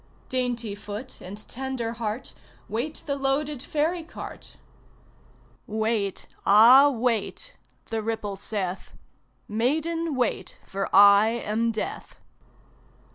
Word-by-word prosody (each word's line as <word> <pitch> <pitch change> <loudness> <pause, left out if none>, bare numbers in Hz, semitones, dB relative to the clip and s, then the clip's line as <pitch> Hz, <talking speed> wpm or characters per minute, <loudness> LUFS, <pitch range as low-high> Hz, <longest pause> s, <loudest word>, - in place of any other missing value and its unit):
Dainty 245 -4 -1
foot 210 +5 -7
and 205 +4 -6
tender 260 -2 -3
heart, 225 +2 -4 0.3
Wait 245 +8 -3
the 280 - -1
loaded 275 0 -1
ferry 315 +5 -1
cart. 325 - -9 1.1
"Wait, 215 -2 -1 0.2
ah, 240 +8 +8
wait!" 250 - -2 0.4
the 225 -1 -1
ripple 215 -2 -3
saith; 195 -2 -4 0.5
"Maiden, 310 +8 0
wait, 250 -2 -1
for 195 0 -3
I 200 +2 +7
am 230 0 0
Death!" 220 - -5
230 Hz, 100 wpm, -26 LUFS, 210-270 Hz, 1.1 s, ah